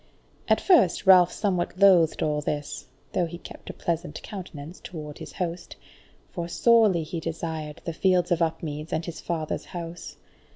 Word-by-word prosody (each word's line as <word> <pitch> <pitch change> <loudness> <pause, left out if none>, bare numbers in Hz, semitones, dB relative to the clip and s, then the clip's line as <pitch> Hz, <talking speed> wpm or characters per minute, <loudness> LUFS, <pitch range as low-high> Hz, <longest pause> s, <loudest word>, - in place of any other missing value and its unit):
At - - +4
first 230 - +4
Ralph 180 -2 +7
somewhat 185 -4 -1
loathed 185 -5 +5
all 150 -1 0
this 145 0 -4 0.3
(though 175 - +1
he 170 - -7
kept - - -11
a - - -5
pleasant 170 -2 -3
countenance 175 -4 -8
toward 150 -4 -8
his - - -9
host), 175 -1 -4 0.6
for 170 -2 -4
sorely 215 -3 +4
he 165 +2 -5
desired 160 -2 -5
the 170 - -3
fields 180 +1 +2
of 170 -1 +2
Upmeads 155 -1 -2
and 160 +1 -1
his 170 - -7
father's 160 -3 -3
house. 170 -1 -7
170 Hz, 160 wpm, -26 LUFS, 160-180 Hz, 0.6 s, Ralph